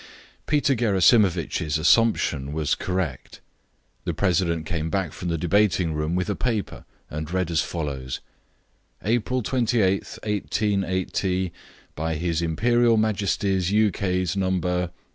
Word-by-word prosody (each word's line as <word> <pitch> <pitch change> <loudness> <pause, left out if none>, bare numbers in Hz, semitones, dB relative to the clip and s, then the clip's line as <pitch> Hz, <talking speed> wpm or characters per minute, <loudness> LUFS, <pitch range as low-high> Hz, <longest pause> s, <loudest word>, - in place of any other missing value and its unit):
Peter 145 -2 +2
Gerasimovitch's 95 - +2
assumption 80 - +2
was 75 -2 0
correct. 90 -8 -3 0.6
The - - -3
president 85 -4 +1
came 80 -1 -2
back 95 -4 -1
from 90 - -6
the 85 -1 0
debating 90 -1 +2
room 75 +2 -1
with 90 0 0
a 105 - -1
paper, 115 -5 -2 0.3
and 75 +1 -4
read 90 -2 -1
as 80 -1 +2
follows: 70 -7 -4 0.8
"April 120 +3 0
28th, 110 -6 +1
188. 95 -3 -1 0.4
By 80 +1 -2
His 85 +1 -1
Imperial 115 +8 +2
Majesty's 100 -3 0
ukase 95 -3 +1
No. 90 -2 0
95 Hz, 115 wpm, -24 LUFS, 80-105 Hz, 0.8 s, Peter